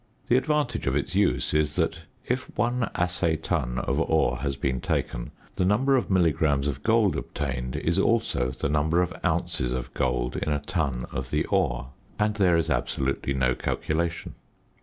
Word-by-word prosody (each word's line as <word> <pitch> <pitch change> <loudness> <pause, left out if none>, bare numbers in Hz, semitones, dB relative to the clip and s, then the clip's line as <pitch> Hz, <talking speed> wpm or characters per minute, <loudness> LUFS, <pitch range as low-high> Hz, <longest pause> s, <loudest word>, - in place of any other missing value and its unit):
The 120 - +5
advantage 135 - 0
of 65 - +1
its 70 - -1
use - - +2
is 75 -1 +1
that 85 - -1 0.2
if 125 +1 -1
one 120 +2 +1
assay 90 -2 +1
ton 75 -6 -2
of 70 +3 0
ore 80 -6 +2
has 70 +1 -2
been 65 -2 -1
taken, - - -2 0.3
the - - +2
number 120 +9 +3
of 130 - 0
milligrams 80 -6 +2
of 70 -2 -2
gold 110 -5 +3
obtained 65 -4 -3
is - - 0
also 60 +1 +2
the 65 - -3
number 80 +4 +2
of 90 - -3
ounces 60 -1 0
of 65 -1 -4
gold 60 -1 -1
in - - -2
a 75 - +2
ton 70 -7 -2
of 65 0 -4
the 75 +2 0
ore, - - +1 0.3
and 105 0 +1
there 90 -4 +4
is 80 - 0
absolutely 70 0 -1
no 65 -1 +2
calculation. 85 +6 -2
75 Hz, 175 wpm, -26 LUFS, 65-90 Hz, 0.3 s, The